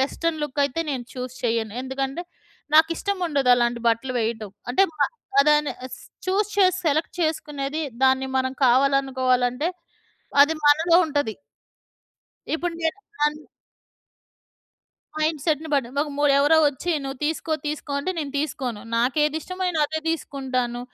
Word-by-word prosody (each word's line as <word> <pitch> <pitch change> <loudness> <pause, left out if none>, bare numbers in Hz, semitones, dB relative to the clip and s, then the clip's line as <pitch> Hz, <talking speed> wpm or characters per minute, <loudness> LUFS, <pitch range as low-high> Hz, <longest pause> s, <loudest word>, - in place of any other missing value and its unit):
Western 315 +4 -1
look 295 -1 -2
అయితే 280 +4 -2
నేను 260 -3 -3
చూస్ 255 -1 -6
చేయను. 225 -2 -1
ఎందుకంటే 270 +4 -3 0.5
నాకిష్టం 330 +5 +3
ఉండదు 275 -5 +2
అలాంటి 240 -1 0
బట్టలు 230 +3 0
వేయటం. 220 -2 -3 0.2
అంటే 260 - +4
మ - - -22 0.5
దాన్ని 300 0 +3 0.5
చూస్ 390 +2 +1
చేసి 370 -2 +4
సెలెక్ట్ 310 +2 +1
చేసుకునేది 300 -2 -2 0.2
దాన్ని 265 0 +3
మనం 260 0 0
కావాలనుకోవాలంటే 260 0 +2 0.8
అది 305 +3 +2
మనలో 325 +3 +5
ఉంటది. 290 -7 -1 1.2
ఇప్పుడు 340 +1 -2
నేను 325 +4 0 0.3
అన్ 300 0 -2 1.8
మైండ్సెట్‌ని 310 0 0
బట్టి 265 -4 +1
వ - - +3 0.2
మొ 290 - +2
ఎవరో 290 +3 +5
వచ్చి 290 +5 -3
నువ్వు 270 -1 -6
తీసుకో 320 +1 -1
తీసుకో 295 -1 -4
అంటే 285 +6 -2
నేను 290 -3 -4
తీస్కోను. 270 -7 -3 0.2
నాకెదిష్టమో 300 +9 0
నేను 330 -3 -1
అదే 315 +1 -3
తీసుకుంటాను. 255 -6 -2
285 Hz, 125 wpm, -24 LUFS, 255-315 Hz, 1.8 s, మనలో